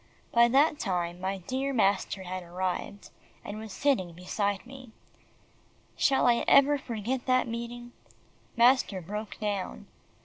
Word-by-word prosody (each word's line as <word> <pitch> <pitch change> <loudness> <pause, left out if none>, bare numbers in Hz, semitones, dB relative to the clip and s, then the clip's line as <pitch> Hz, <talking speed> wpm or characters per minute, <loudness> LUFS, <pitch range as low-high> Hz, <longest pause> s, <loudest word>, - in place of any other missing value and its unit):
By 235 0 +6
that 290 +5 +3
time, 175 -2 -2
my 190 +1 -2
dear 260 +9 -3
master 200 -3 +1
had 185 0 -5
arrived, 180 +3 -4 0.3
and 205 +1 -6
was 220 -1 -8
sitting 190 -10 0
beside 200 +4 -2
me. 260 -1 -11 1.1
Shall 270 - +3
I 240 -1 +3
ever 280 +1 +5
forget 245 +2 -4
that 255 -1 +3
meeting! 235 +1 -6 0.7
Master 240 -5 +4
broke 210 +4 -6
down. 200 - -3
220 Hz, 130 wpm, -28 LUFS, 190-255 Hz, 1.1 s, By